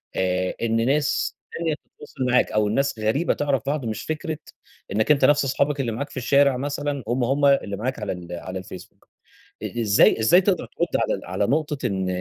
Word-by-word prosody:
آآ 90 Hz, 0 st, 0 dB
إن 115 Hz, 0 st, +1 dB
ناس 145 Hz, +2 st, +1 dB, 0.2 s
تانية 165 Hz, -2 st, -1 dB
تتواصل 145 Hz, -2 st, -7 dB
معاك 125 Hz, 0 st, +2 dB
أو 105 Hz, -1 st, +2 dB
الناس 115 Hz, +1 st, 0 dB
غريبة 110 Hz, +11 st, +1 dB
تعرف 140 Hz, -2 st, 0 dB
بعض 140 Hz, -2 st, -2 dB
مش 110 Hz, -2 st, -3 dB
فكرة 155 Hz, 0 st, -3 dB, 0.5 s
إنك 110 Hz, +7 st, +2 dB
أنتَ 145 Hz, -, +4 dB
نفس 145 Hz, -1 st, +4 dB
أصحابك 140 Hz, +2 st, 0 dB
اللي 120 Hz, -4 st, -1 dB
معاك 140 Hz, +6 st, -4 dB
في -, -, -11 dB
الشارع 140 Hz, +1 st, +3 dB
مثلًا 145 Hz, 0 st, -3 dB
هم، 120 Hz, +2 st, 0 dB
هم 140 Hz, +3 st, +1 dB
اللي 135 Hz, -8 st, +3 dB
معاك 125 Hz, +3 st, -3 dB
على 105 Hz, -, -3 dB
ال 90 Hz, -2 st, -7 dB
على 95 Hz, +2 st, -5 dB
الفيسبوك. 90 Hz, -1 st, -12 dB, 0.6 s
إ 120 Hz, -, -3 dB
إزاي 105 Hz, 0 st, +4 dB
إزاي 145 Hz, -, +5 dB
تقدر 185 Hz, -3 st, 0 dB
ترد -, -, -2 dB, 0.2 s
على -, -, -1 dB
على 100 Hz, -, -1 dB
نقطة 150 Hz, -3 st, -1 dB
إن 95 Hz, -3 st, -2 dB
130 Hz, 190 wpm, -23 LUFS, 110-145 Hz, 0.6 s, إزاي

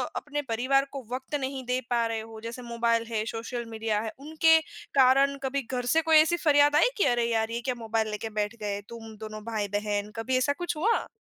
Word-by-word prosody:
अपने 295 Hz, 0 st, -3 dB
परिवार 265 Hz, +4 st, +2 dB
को 275 Hz, -2 st, -6 dB
वक़्त 260 Hz, +3 st, -4 dB
नहीं 265 Hz, 0 st, -4 dB
दे 250 Hz, +1 st, 0 dB
पा 235 Hz, -1 st, +2 dB
रहे 225 Hz, -1 st, -2 dB
हो 220 Hz, 0 st, -10 dB
जैसे 235 Hz, +2 st, -6 dB
मोबाइल 230 Hz, 0 st, +1 dB
है, 215 Hz, -2 st, -1 dB
सोशल 230 Hz, +2 st, -4 dB
मीडिया 220 Hz, -1 st, -1 dB
है 220 Hz, -, -4 dB
उनके 320 Hz, +2 st, +4 dB, 0.4 s
कारण 275 Hz, +2 st, +5 dB
कभी 275 Hz, +1 st, -1 dB
घर 245 Hz, -1 st, -2 dB
से 325 Hz, -, +5 dB
कोई 320 Hz, -1 st, +5 dB
ऐसी 325 Hz, +3 st, +4 dB
फरियाद 290 Hz, 0 st, +5 dB
आई 320 Hz, +11 st, +5 dB
कि 405 Hz, -, +3 dB
अरे 240 Hz, -1 st, +1 dB
यार 225 Hz, 0 st, 0 dB
ये 235 Hz, -, -3 dB
क्या 255 Hz, -, 0 dB
मोबाइल 225 Hz, -1 st, -1 dB
ले 210 Hz, -, -3 dB
के 225 Hz, -, -3 dB
बैठ 210 Hz, +2 st, -1 dB
गए 205 Hz, -1 st, -2 dB
तुम 225 Hz, -2 st, -9 dB
दोनों 215 Hz, 0 st, -7 dB
भाई-बहन 205 Hz, 0 st, -2 dB
कभी 255 Hz, +3 st, 0 dB
ऐसा 285 Hz, +3 st, +2 dB
कुछ 345 Hz, -, -2 dB
हुआ? 450 Hz, +8 st, +1 dB
240 Hz, 220 wpm, -27 LUFS, 220-280 Hz, 0.4 s, कारण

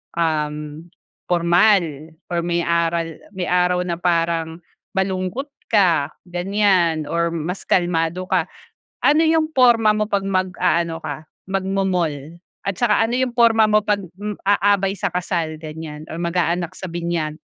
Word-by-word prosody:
um, 155 Hz, -3 st, 0 dB, 0.7 s
pormal 170 Hz, -3 st, +3 dB, 0.2 s
or 170 Hz, -, +1 dB
may 170 Hz, 0 st, -1 dB
aral 170 Hz, 0 st, +1 dB, 0.3 s
may 180 Hz, -, -1 dB
araw 180 Hz, 0 st, +1 dB
na 175 Hz, -, -2 dB
parang 165 Hz, -2 st, 0 dB, 0.4 s
malungkot 190 Hz, +6 st, -1 dB, 0.2 s
ka 180 Hz, -, +3 dB, 0.2 s
ganiyan 180 Hz, -3 st, +1 dB
or 170 Hz, +2 st, 0 dB
mas 170 Hz, +3 st, -4 dB
kalmado 175 Hz, 0 st, 0 dB
ka. -, -, 0 dB, 0.5 s
Ano 315 Hz, +3 st, +4 dB
'yung 320 Hz, -1 st, +2 dB
porma 240 Hz, -6 st, +5 dB
mo 215 Hz, 0 st, 0 dB
pag 200 Hz, -2 st, 0 dB
mag-aano 180 Hz, -3 st, 0 dB
ka 155 Hz, 0 st, -6 dB, 0.2 s
magmo-mall 185 Hz, -5 st, -2 dB, 0.2 s
at 200 Hz, -2 st, -3 dB
saka 225 Hz, -2 st, +3 dB
ano 240 Hz, +3 st, 0 dB
'yung 255 Hz, -2 st, -1 dB
porma 225 Hz, -2 st, +5 dB
mo 215 Hz, 0 st, +3 dB
'pag 205 Hz, -1 st, +1 dB, 0.5 s
aabay 200 Hz, -1 st, +3 dB
sa 190 Hz, -, -2 dB
kasal 170 Hz, -3 st, -2 dB
ganiyan 155 Hz, -1 st, -8 dB
or -, -, -7 dB
mag-aanak 170 Hz, 0 st, 0 dB
sa 185 Hz, -, -5 dB
binyag? 170 Hz, -3 st, -3 dB
180 Hz, 135 wpm, -21 LUFS, 165-200 Hz, 0.7 s, porma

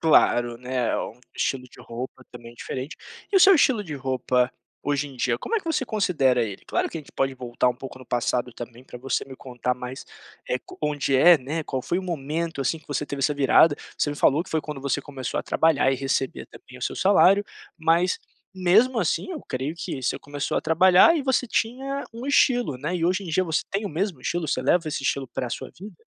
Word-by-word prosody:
Claro, 120 Hz, -6 st, +4 dB
né, 125 Hz, -1 st, -1 dB
um 115 Hz, -, -6 dB, 0.2 s
estilo 130 Hz, -2 st, -1 dB
de 125 Hz, -, -16 dB
roupa 125 Hz, +2 st, -7 dB
também 120 Hz, -1 st, -11 dB
diferente. 130 Hz, +4 st, -6 dB, 0.4 s
E -, -, +4 dB
o 380 Hz, -, +6 dB
seu 385 Hz, +2 st, +8 dB
estilo 260 Hz, -, +3 dB
de 155 Hz, -7 st, -6 dB
roupa 130 Hz, -2 st, 0 dB, 0.3 s
hoje 145 Hz, 0 st, -1 dB
em 135 Hz, -, -13 dB
dia, 120 Hz, -1 st, +1 dB
como 455 Hz, -, -2 dB
é -, -, +3 dB
que 380 Hz, -, -15 dB
você 320 Hz, -5 st, 0 dB
considera 155 Hz, -, +2 dB
ele? 100 Hz, -3 st, -7 dB
Claro -, -, 0 dB
que -, -, -7 dB
a -, -, -6 dB
gente 145 Hz, -, -16 dB
pode 135 Hz, 0 st, 0 dB
voltar 125 Hz, -1 st, 0 dB
um 125 Hz, -, 0 dB
pouco 130 Hz, +1 st, -9 dB
no 130 Hz, -, -14 dB
passado 120 Hz, 0 st, -1 dB
também, 120 Hz, +1 st, -9 dB
para 125 Hz, -, -10 dB
você 135 Hz, +2 st, -1 dB
me 135 Hz, -, -10 dB
contar 125 Hz, -1 st, -3 dB
mais 125 Hz, +1 st, -7 dB, 0.6 s
co -, -, -12 dB
onde 145 Hz, -2 st, +1 dB
é, 175 Hz, +6 st, +8 dB
né. 145 Hz, +5 st, -3 dB
Qual 130 Hz, -1 st, -3 dB
foi 175 Hz, -, -1 dB
o -, -, -4 dB
momento 165 Hz, -2 st, -3 dB
assim 135 Hz, +5 st, 0 dB
que 155 Hz, -, -24 dB
você 145 Hz, 0 st, -2 dB
teve 140 Hz, -1 st, -5 dB
essa 150 Hz, +2 st, +2 dB
virada, 145 Hz, +2 st, +5 dB, 0.2 s
você 145 Hz, -, +1 dB
me 145 Hz, -, -5 dB
falou 145 Hz, +2 st, +3 dB
que -, -, -14 dB
foi 160 Hz, -, +1 dB
quando 150 Hz, -2 st, -7 dB
você 140 Hz, -1 st, -1 dB
começou 135 Hz, -4 st, -4 dB
a -, -, -10 dB
trabalhar 145 Hz, -4 st, +2 dB
e 135 Hz, -, 0 dB
receber 135 Hz, 0 st, -2 dB
também 125 Hz, 0 st, -14 dB
o 125 Hz, -, -11 dB
seu -, -, -2 dB
salário, 195 Hz, +1 st, +5 dB, 0.3 s
mas 170 Hz, +2 st, +2 dB, 0.4 s
mesmo 215 Hz, +8 st, +4 dB
assim 180 Hz, -, -1 dB
eu 310 Hz, -, -5 dB
creio 130 Hz, +5 st, -3 dB
que 135 Hz, -5 st, -5 dB
você 125 Hz, -, -1 dB
começou 145 Hz, 0 st, -3 dB
a -, -, +2 dB
trabalhar 185 Hz, -, +6 dB
e 295 Hz, -, -1 dB
você 265 Hz, -1 st, +1 dB
tinha 265 Hz, +5 st, -2 dB
um 235 Hz, +3 st, -7 dB
estilo, 245 Hz, -, +3 dB
né, 150 Hz, +7 st, -3 dB
e 165 Hz, -, -1 dB
hoje 185 Hz, +3 st, +1 dB
em -, -, -8 dB
dia 165 Hz, +3 st, +2 dB
você 160 Hz, -2 st, 0 dB
tem 200 Hz, +2 st, -2 dB
o -, -, -3 dB
mesmo 175 Hz, -2 st, -2 dB
estilo? 170 Hz, +3 st, -2 dB
Você 130 Hz, -, -1 dB
leva 165 Hz, +5 st, +2 dB
esse 150 Hz, -, -3 dB
estilo 135 Hz, 0 st, -1 dB
para 125 Hz, -, -4 dB
sua -, -, -5 dB
vida? 195 Hz, 0 st, -10 dB
145 Hz, 230 wpm, -25 LUFS, 130-180 Hz, 0.6 s, seu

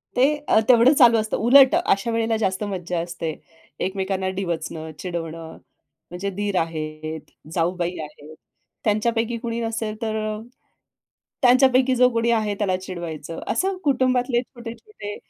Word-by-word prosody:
ते 250 Hz, -, +3 dB, 0.5 s
तेवढं 245 Hz, +3 st, +7 dB
चालू 240 Hz, -5 st, +6 dB
असतं. 220 Hz, 0 st, -1 dB
उलट 265 Hz, +3 st, +6 dB
अशा 200 Hz, +4 st, +1 dB
वेळेला 225 Hz, 0 st, 0 dB
जास्त 190 Hz, -2 st, -1 dB
मज्जा 180 Hz, -2 st, -3 dB
असते. 170 Hz, -1 st, -4 dB, 0.5 s
एकमेकांना 190 Hz, 0 st, -2 dB
डिवचणं, 160 Hz, -3 st, -4 dB
चिडवणं, 165 Hz, -2 st, -6 dB, 0.5 s
म्हणजे 180 Hz, +3 st, -4 dB
दीर 205 Hz, -2 st, -1 dB
आहेत, 155 Hz, -1 st, -5 dB, 0.2 s
जाऊबाई 175 Hz, 0 st, -1 dB
आहेत. 150 Hz, +1 st, -12 dB, 0.5 s
त्यांच्यापैकी 225 Hz, +2 st, 0 dB
कुणी 230 Hz, 0 st, -4 dB
नसेल 225 Hz, -1 st, -3 dB
तर, 220 Hz, -1 st, -2 dB, 1.3 s
त्यांच्यापैकी 255 Hz, 0 st, +5 dB
जो 250 Hz, 0 st, +5 dB
कोणी 230 Hz, 0 st, +1 dB
आहे 215 Hz, -3 st, +1 dB
त्याला 195 Hz, -3 st, +1 dB
चिडवायचं. 170 Hz, -4 st, -7 dB
असं 385 Hz, 0 st, 0 dB
कुटुंबातले 255 Hz, -3 st, +2 dB
छोटे-छोटे 235 Hz, -, -9 dB
205 Hz, 120 wpm, -23 LUFS, 175-235 Hz, 1.3 s, तेवढं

